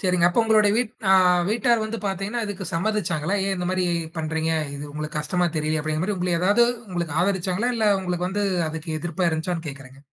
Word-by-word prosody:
சரிங்க. 180 Hz, -3 st, +3 dB
அப்ப 180 Hz, -, +2 dB
உங்களுட 215 Hz, -2 st, +4 dB
வீட் 240 Hz, -2 st, 0 dB, 0.2 s
அ -, -, +7 dB, 0.4 s
வீட்டார் 235 Hz, 0 st, +2 dB
வந்து 225 Hz, +1 st, -4 dB
பாத்தீங்கன்னா 195 Hz, +5 st, -2 dB
இதுக்கு 200 Hz, -2 st, -5 dB
சம்மதிச்சாங்களா, 175 Hz, -2 st, -1 dB
"ஏன் 195 Hz, -, 0 dB
இந்த 180 Hz, 0 st, -3 dB
மாரி 185 Hz, -1 st, 0 dB, 0.3 s
பண்றீங்க? 160 Hz, 0 st, -1 dB, 0.2 s
இது 140 Hz, +1 st, -6 dB
உங்களுக்கு 150 Hz, 0 st, -4 dB
கஷ்டமா 175 Hz, +4 st, 0 dB
தெரியலையா?" 155 Hz, 0 st, 0 dB
அப்டிங்கற 155 Hz, +1 st, -1 dB
மாரி 205 Hz, -1 st, -1 dB
உங்கள 180 Hz, 0 st, -1 dB
ஏதாவது 205 Hz, +6 st, +4 dB, 0.2 s
உங்களுக்கு 170 Hz, -4 st, -3 dB
ஆதரிச்சாங்களா, 190 Hz, +4 st, 0 dB
இல்ல 220 Hz, -, +1 dB
உங்களுக்கு 180 Hz, -1 st, -2 dB
வந்து 205 Hz, +1 st, -1 dB, 0.2 s
அதுக்கு 160 Hz, 0 st, -6 dB
எதிர்ப்பா 175 Hz, +1 st, -1 dB
இருந்துச்சான்னு 165 Hz, +1 st, -2 dB
கேக்குறன்ங்க. 135 Hz, 0 st, -11 dB
180 Hz, 185 wpm, -24 LUFS, 160-205 Hz, 0.4 s, அ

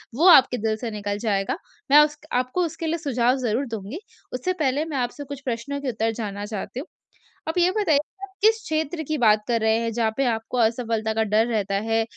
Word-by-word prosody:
वो 335 Hz, +7 st, +4 dB
आपके 260 Hz, -5 st, +7 dB
दिल 220 Hz, 0 st, 0 dB
से 230 Hz, -1 st, -5 dB
निकल 205 Hz, -1 st, -3 dB
जाएगा, 200 Hz, -3 st, -1 dB, 0.3 s
मैं 295 Hz, -, +9 dB
उस 295 Hz, 0 st, -6 dB
क 300 Hz, -, -21 dB
आपको 255 Hz, +8 st, 0 dB
उसके 325 Hz, +1 st, -5 dB
लिए 335 Hz, +2 st, 0 dB
सुझाव 255 Hz, -5 st, +1 dB
ज़रूर 245 Hz, +2 st, -1 dB
दूँगी। 225 Hz, -, -6 dB, 0.3 s
उससे 365 Hz, +9 st, -1 dB
पहले 285 Hz, +1 st, +1 dB
मैं 300 Hz, -4 st, -4 dB
आपसे 250 Hz, +3 st, -3 dB
कुछ 285 Hz, 0 st, -8 dB
प्रश्नों 255 Hz, +4 st, -3 dB
के 270 Hz, -, -2 dB
उत्तर 225 Hz, -1 st, 0 dB
जानना 205 Hz, -2 st, -4 dB
चाहती 215 Hz, +4 st, -5 dB
हूँ। 310 Hz, -, -7 dB, 0.6 s
आप 325 Hz, -, -3 dB
ये 355 Hz, +1 st, +4 dB
बताइए, 330 Hz, -9 st, +3 dB, 0.3 s
आप 390 Hz, -1 st, -8 dB
किस 445 Hz, +1 st, +4 dB
क्षेत्र 315 Hz, +1 st, -2 dB
की 310 Hz, -1 st, -1 dB
बात 215 Hz, -3 st, +4 dB
कर 230 Hz, -2 st, +1 dB
रहे 220 Hz, 0 st, +3 dB
हैं, 230 Hz, 0 st, -2 dB
जहाँ 225 Hz, -1 st, +1 dB
पे 275 Hz, -, +2 dB
आपको 225 Hz, +3 st, -6 dB
असफलता 225 Hz, -1 st, 0 dB
का 220 Hz, 0 st, +1 dB
डर 220 Hz, +2 st, +2 dB
रहता 200 Hz, -4 st, -1 dB
है? 225 Hz, 0 st, +2 dB
245 Hz, 220 wpm, -24 LUFS, 220-295 Hz, 0.6 s, मैं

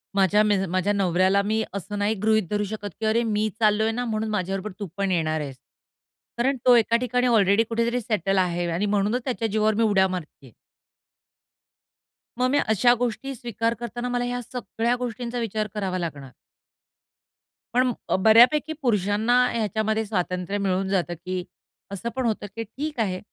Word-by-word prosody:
माझ्या 200 Hz, +1 st, +4 dB
मि 210 Hz, -1 st, +3 dB
माझ्या 185 Hz, +3 st, +1 dB
नवऱ्याला 190 Hz, 0 st, +2 dB
मी 220 Hz, +1 st, 0 dB
असं 200 Hz, +1 st, -5 dB
नाही 205 Hz, +2 st, +1 dB
गृहीत 220 Hz, 0 st, +3 dB
धरू 210 Hz, 0 st, 0 dB
शकत, 205 Hz, 0 st, -5 dB
की 220 Hz, -, -2 dB
"अरे 225 Hz, +2 st, +2 dB
मी 215 Hz, -1 st, 0 dB
चाललोय 220 Hz, 0 st, +3 dB
ना, 245 Hz, +2 st, -3 dB
म्हणून 220 Hz, -1 st, -2 dB
माझ्याबरोबर 195 Hz, 0 st, -2 dB
तू 200 Hz, -, -4 dB
पण 195 Hz, -1 st, 0 dB
येणार 155 Hz, -3 st, 0 dB
आहेस." 135 Hz, -3 st, -7 dB, 0.8 s
कारण 265 Hz, +3 st, +1 dB
तो 250 Hz, -1 st, +7 dB
एका 230 Hz, 0 st, +3 dB
ठिकाणी 250 Hz, +1 st, 0 dB
ऑलरेडी 210 Hz, -2 st, +4 dB
कुठेतरी 235 Hz, +2 st, 0 dB
सेटल 195 Hz, -4 st, 0 dB
आहे 175 Hz, -1 st, +1 dB
आणि 175 Hz, +5 st, 0 dB
म्हणूनच 210 Hz, +4 st, +1 dB
त्याच्या 240 Hz, -4 st, -1 dB
जीवावर 215 Hz, 0 st, +1 dB
मी 230 Hz, -, +2 dB
उड्या 200 Hz, -3 st, +3 dB
मारतीये. 160 Hz, -8 st, -7 dB, 1.9 s
मग 255 Hz, 0 st, +2 dB
मी 290 Hz, -, +3 dB
अशा 240 Hz, +3 st, +5 dB
गोष्टी 245 Hz, +3 st, -2 dB
स्वीकार 230 Hz, -2 st, -2 dB
करतांना 240 Hz, +1 st, -4 dB
मला 245 Hz, 0 st, -1 dB
ह्या 245 Hz, 0 st, -3 dB
सगळ्या 240 Hz, -1 st, -2 dB
गोष्टींचा 245 Hz, 0 st, -4 dB
विचार 215 Hz, -2 st, -2 dB
करावा 190 Hz, -3 st, -2 dB
लागणार. 145 Hz, -6 st, -6 dB, 1.4 s
पण 250 Hz, 0 st, +3 dB, 0.2 s
अ, -, -, +3 dB
बऱ्यापैकी 240 Hz, +10 st, +5 dB
पुरुषांना 215 Hz, -1 st, +1 dB, 0.2 s
ह्याच्यामध्ये 220 Hz, 0 st, -1 dB
स्वातंत्र्य 180 Hz, -1 st, -2 dB
मिळून 195 Hz, -1 st, 0 dB
जातं, 180 Hz, -3 st, 0 dB
की 180 Hz, +2 st, -5 dB, 0.5 s
असं 200 Hz, +4 st, -4 dB
पण 260 Hz, -1 st, -1 dB
होतं 220 Hz, -2 st, -1 dB
की 230 Hz, -, -3 dB
ठीक 280 Hz, +6 st, -6 dB
आहे. 190 Hz, -5 st, 0 dB
215 Hz, 165 wpm, -24 LUFS, 195-235 Hz, 1.9 s, तो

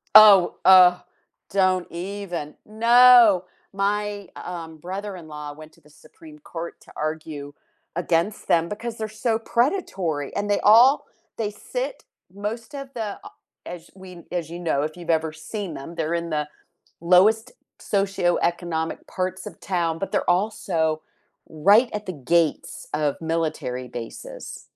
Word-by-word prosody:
Oh, 205 Hz, -4 st, +9 dB
uh, 180 Hz, -1 st, +8 dB, 0.5 s
don't 185 Hz, -2 st, +2 dB
even. 175 Hz, -3 st, -5 dB
No! 230 Hz, -3 st, +6 dB, 0.3 s
My 205 Hz, 0 st, -1 dB
um, 165 Hz, -3 st, -7 dB
brother-in-law 175 Hz, -5 st, -7 dB
went 155 Hz, +1 st, -13 dB
to 170 Hz, -, -24 dB
the 150 Hz, -, -22 dB
Supreme 305 Hz, -, -16 dB
Court 170 Hz, -, -7 dB
to -, -, -17 dB
argue 155 Hz, -2 st, -5 dB, 0.4 s
against 175 Hz, +4 st, -1 dB
them 170 Hz, 0 st, +2 dB
because 230 Hz, +2 st, -5 dB
they're 220 Hz, -, -3 dB
so 220 Hz, +1 st, -1 dB
predatory. 210 Hz, -, -1 dB
And 205 Hz, 0 st, -2 dB
they 205 Hz, -, +2 dB
all 240 Hz, +7 st, +6 dB, 0.3 s
they 215 Hz, -2 st, -2 dB
sit -, -, -5 dB, 0.3 s
most 220 Hz, +5 st, -5 dB
of 275 Hz, -1 st, -7 dB
the, 220 Hz, -4 st, -4 dB
uh, -, -, -10 dB, 0.4 s
as 175 Hz, -1 st, -9 dB
we 185 Hz, -3 st, -12 dB
as 170 Hz, -3 st, -3 dB
you 170 Hz, -, -7 dB
know, 160 Hz, -5 st, 0 dB
if 155 Hz, +1 st, -3 dB
you've 170 Hz, -1 st, -10 dB
ever 160 Hz, -1 st, +1 dB
seen 185 Hz, +4 st, -6 dB
them, 165 Hz, +5 st, -8 dB
they're 165 Hz, 0 st, -2 dB
in 170 Hz, 0 st, -2 dB
the 150 Hz, -2 st, -1 dB, 0.5 s
lowest 215 Hz, +8 st, +4 dB, 0.3 s
socioeconomic 175 Hz, -4 st, -1 dB
parts 185 Hz, +2 st, -4 dB
of -, -, -11 dB
town, 170 Hz, -4 st, -1 dB
but 195 Hz, -1 st, -4 dB
they're -, -, 0 dB
also 175 Hz, -5 st, 0 dB, 0.5 s
right 200 Hz, +10 st, +4 dB
at 210 Hz, 0 st, -4 dB
the 185 Hz, -, -4 dB
gates 160 Hz, +2 st, 0 dB
of 150 Hz, -2 st, 0 dB
military 155 Hz, -6 st, -2 dB
bases. -, -, -8 dB
180 Hz, 140 wpm, -23 LUFS, 160-210 Hz, 0.5 s, Oh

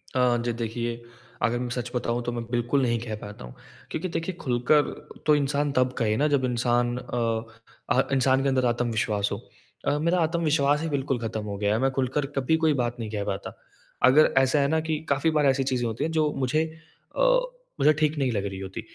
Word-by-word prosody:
अ, 125 Hz, -1 st, +3 dB
जी 120 Hz, -, 0 dB
देखिए, 115 Hz, +1 st, -3 dB, 0.4 s
अगर 120 Hz, +1 st, +1 dB
मैं 125 Hz, -, -3 dB
सच 125 Hz, 0 st, -4 dB
बताऊँ 120 Hz, 0 st, -1 dB
तो 120 Hz, -, -2 dB
मैं 120 Hz, -1 st, -4 dB
बिल्कुल 120 Hz, +3 st, +1 dB
नहीं 120 Hz, -2 st, +1 dB
कह 110 Hz, -2 st, -5 dB
पाता 105 Hz, -11 st, -9 dB
हूँ। -, -, -11 dB, 0.4 s
क्योंकि 175 Hz, +3 st, -3 dB
देखिए 165 Hz, +2 st, -3 dB
खुलकर 125 Hz, +3 st, +3 dB, 0.4 s
तो 150 Hz, -, +5 dB
इंसान 145 Hz, 0 st, 0 dB
तब 130 Hz, -1 st, +2 dB
कहे 110 Hz, -2 st, +1 dB
ना 150 Hz, +2 st, +3 dB
जब 140 Hz, -3 st, +2 dB
इंसान 120 Hz, 0 st, +1 dB
अ, 115 Hz, -2 st, -2 dB, 0.5 s
अह 130 Hz, -, +5 dB
इंसान 130 Hz, 0 st, +3 dB
के 140 Hz, -, +2 dB
अंदर 130 Hz, -1 st, +1 dB
आत्मविश्वास 115 Hz, -4 st, 0 dB
हो। -, -, -2 dB, 0.5 s
अ, 145 Hz, -, +2 dB
मेरा 170 Hz, +3 st, +2 dB
आत्मविश्वास 155 Hz, -3 st, +2 dB
ही 165 Hz, -, -2 dB
बिल्कुल 135 Hz, -3 st, -1 dB
ख़त्म 110 Hz, -2 st, -4 dB
हो 100 Hz, -1 st, -4 dB
गया 105 Hz, 0 st, +1 dB
है। 110 Hz, -, +1 dB
मैं 135 Hz, -, +2 dB
खुलकर 135 Hz, +2 st, -1 dB
कभी 135 Hz, +4 st, +2 dB
कोई 155 Hz, -2 st, +4 dB
बात 120 Hz, 0 st, -2 dB
नहीं 110 Hz, -2 st, -4 dB
कह 105 Hz, -2 st, -2 dB
पाता। 95 Hz, -, -5 dB, 0.5 s
अगर 135 Hz, +5 st, +6 dB
ऐसा 135 Hz, +2 st, +4 dB
है 140 Hz, -, +3 dB
ना 160 Hz, +2 st, +2 dB
कि 155 Hz, -1 st, 0 dB
काफ़ी 140 Hz, +3 st, +2 dB
बार 150 Hz, -1 st, +3 dB
ऐसी 135 Hz, 0 st, +3 dB
चीज़ें 130 Hz, -2 st, -1 dB
होती 110 Hz, 0 st, -3 dB
हैं 165 Hz, -, -1 dB
जो 155 Hz, -2 st, +1 dB
मुझे 135 Hz, +4 st, +1 dB, 0.5 s
अ, -, -, +1 dB, 0.6 s
मुझे 150 Hz, -, +6 dB
ठीक 155 Hz, 0 st, 0 dB
नहीं 130 Hz, -3 st, +1 dB
लग 100 Hz, -2 st, -1 dB
रही 95 Hz, -1 st, -5 dB
होती। 95 Hz, +3 st, -6 dB
125 Hz, 215 wpm, -26 LUFS, 115-145 Hz, 0.6 s, अगर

